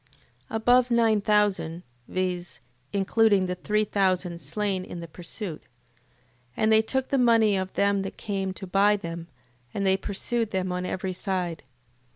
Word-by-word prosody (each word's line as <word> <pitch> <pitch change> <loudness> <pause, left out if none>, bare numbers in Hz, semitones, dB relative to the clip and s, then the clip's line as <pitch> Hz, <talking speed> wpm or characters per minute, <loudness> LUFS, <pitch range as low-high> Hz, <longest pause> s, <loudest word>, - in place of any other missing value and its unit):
Above 245 +3 +3
nine 225 -3 +3
thousand... 200 -5 +1 0.2
Viz., 180 -6 -3 0.3
including 200 0 +3
the 180 - -2
three 210 +4 0
thousand 185 -4 0
slain 200 -3 -2
in 175 - -8
the 170 - -7
pursuit. 170 +1 -6
8:25. - - -31 0.9
And 220 0 +3
they 220 0 +6
took 265 +4 -2
the 275 - +2
money 225 -4 +4
of 190 0 -2
them 200 0 +2
that 195 - -6
came 195 -3 -2
to 190 - -8
buy 200 +3 +4
them, 170 -3 -6 0.5
and 200 - -1
they 190 0 +4
pursued 220 +3 -2
them 185 -2 -1
on 180 0 -2
every 185 0 -3
side. 180 -4 -2
195 Hz, 160 wpm, -26 LUFS, 185-215 Hz, 0.9 s, they